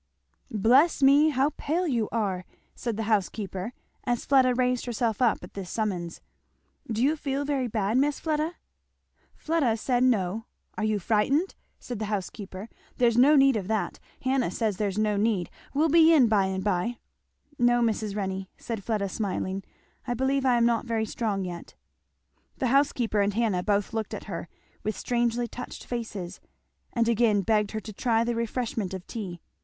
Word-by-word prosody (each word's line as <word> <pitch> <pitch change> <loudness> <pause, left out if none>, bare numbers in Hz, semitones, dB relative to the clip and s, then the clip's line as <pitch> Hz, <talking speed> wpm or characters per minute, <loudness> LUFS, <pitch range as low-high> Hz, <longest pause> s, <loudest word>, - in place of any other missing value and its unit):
"Bless 260 - +4
me, 285 +3 +6
how 280 0 +2
pale 345 +5 0
you 235 -7 0
are!" 200 -5 -1 0.3
said 235 -3 -4
the 225 - -1
housekeeper, 205 -1 -1 0.3
as 240 -1 -1
Fleda 260 -2 +4
raised 250 0 0
herself 230 -1 -1
up 235 -7 +2
at 180 - -11
this 190 -3 -6
summons, 180 -6 -3 0.7
"do 225 +2 0
you 295 +4 +3
feel 285 -1 -2
very 275 -3 0
bad, 215 +1 +1
Miss 290 +1 +1
Fleda?" 315 +2 -1 0.8
Fleda 300 -9 +1
said 245 +2 +1
no. 220 -3 +1 0.3
"Are 215 - -3
you 215 -1 +1
frighted?" 230 - +1 0.3
said 245 -4 -6
the 215 - -2
housekeeper; 200 0 -5 0.3
"there's 235 -2 +3
no 270 +5 +6
need 270 -2 +5
of 195 -4 -2
that 220 -1 -1 0.2
Hannah 260 -1 +1
says 215 -5 -1
there's 200 -2 -1
no 210 -1 +1
need 205 -4 0 0.2
we'll 300 +3 +2
be 325 +1 +6
in 285 -7 +6
by 210 -3 +3
and 190 0 -3
by." 205 +4 0 0.6
"No, 240 0 +4
Mrs. 215 -2 -1
Renney," 190 -2 -3
said 225 -4 -5
Fleda 210 -2 -1
smiling. 195 -1 -3 0.4
"I 245 - 0
believe 265 +2 +1
I 245 -1 +4
am 235 - +4
not 235 0 +1
very 225 -2 0
strong 205 -3 -2
yet." 175 -1 -8 0.8
The 255 - 0
housekeeper 245 -6 +2
and 200 0 0
Hannah 215 -6 +1
both 205 +2 0
looked 220 -1 -3
at - - -7
her 170 -4 -6 0.3
with 215 - -3
strangely 240 0 0
touched 250 +1 -8
faces, 210 -7 -5 0.5
and 230 -1 +1
again 225 -3 +3
begged 210 0 +2
her 220 - -1
to 215 0 -9
try 230 +1 +1
the 240 0 -1
refreshment 230 -4 -2
of 185 - -8
tea. 185 -7 -6
225 Hz, 170 wpm, -27 LUFS, 205-250 Hz, 0.8 s, me